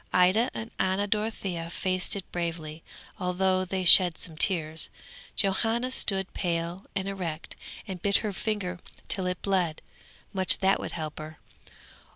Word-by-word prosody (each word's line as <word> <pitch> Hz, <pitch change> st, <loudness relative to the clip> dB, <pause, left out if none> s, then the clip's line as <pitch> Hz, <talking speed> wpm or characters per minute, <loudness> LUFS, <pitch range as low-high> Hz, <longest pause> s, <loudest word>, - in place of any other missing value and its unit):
Ida 185 Hz, +7 st, +3 dB
and 220 Hz, +1 st, -6 dB
Anna 190 Hz, +2 st, 0 dB
Dorothea 200 Hz, -5 st, -3 dB
faced 185 Hz, +2 st, -1 dB
it 195 Hz, -, -6 dB
bravely, 165 Hz, -2 st, -5 dB, 0.4 s
although 185 Hz, 0 st, 0 dB
they 185 Hz, +1 st, -3 dB
shed 175 Hz, -1 st, +10 dB
some 165 Hz, -3 st, -7 dB
tears; 160 Hz, -2 st, +2 dB, 0.5 s
Johanna 225 Hz, +5 st, 0 dB
stood 195 Hz, -6 st, -1 dB
pale 170 Hz, +1 st, -3 dB
and 195 Hz, -1 st, -3 dB
erect 175 Hz, -5 st, -6 dB, 0.3 s
and 185 Hz, -3 st, -7 dB
bit 200 Hz, -1 st, 0 dB
her 210 Hz, -, -3 dB
finger 185 Hz, -3 st, -4 dB, 0.3 s
till 190 Hz, -2 st, -2 dB
it 180 Hz, -1 st, -3 dB
bled! 180 Hz, -5 st, -1 dB, 0.5 s
Much 190 Hz, -2 st, +2 dB
that 195 Hz, 0 st, +1 dB
would -, -, -6 dB
help 155 Hz, -2 st, -6 dB
her! 155 Hz, +1 st, -9 dB
185 Hz, 145 wpm, -27 LUFS, 170-195 Hz, 0.5 s, shed